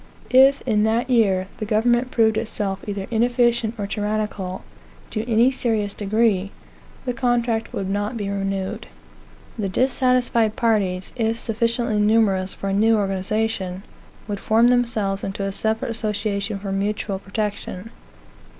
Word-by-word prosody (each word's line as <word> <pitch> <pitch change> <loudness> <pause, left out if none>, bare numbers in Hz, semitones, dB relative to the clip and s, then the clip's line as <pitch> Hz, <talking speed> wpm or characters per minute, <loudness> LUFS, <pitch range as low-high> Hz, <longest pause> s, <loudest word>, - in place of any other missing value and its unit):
If, 265 +2 +6
in 215 -4 +1
that 235 +4 0
year, 195 -6 +3
the 215 - -4
government 240 +4 +2
proved 220 -3 +3
itself 205 -3 -3
either 200 -1 -3
inefficient 240 -1 +2
or 205 - -3
tyrannical, 205 -2 -3 0.5
to 220 +2 -3
any 235 +4 +5
serious 220 -6 -1
degree, 205 -2 +1 0.6
the 250 - -1
contract 235 -2 0
would 195 - -3
not 205 +4 -2
be 205 -2 -3
renewed. 195 +1 -3 0.7
The 200 -2 -1
dissatisfied 250 -1 +2
parties, 195 -5 0
if 225 -2 0
sufficiently 230 -1 0
numerous 210 -3 +3
for 195 - -4
a - - 0
new 220 +3 +4
organization, 195 -1 -2 0.4
would 205 -2 -3
form 225 +4 +4
themselves 225 -5 +1
into 195 0 -3
a 195 - -1
separate 220 +3 -1
association 210 -2 -2
for 195 0 -5
mutual 200 0 -2
protection. 205 0 -4
215 Hz, 135 wpm, -22 LUFS, 200-230 Hz, 0.7 s, If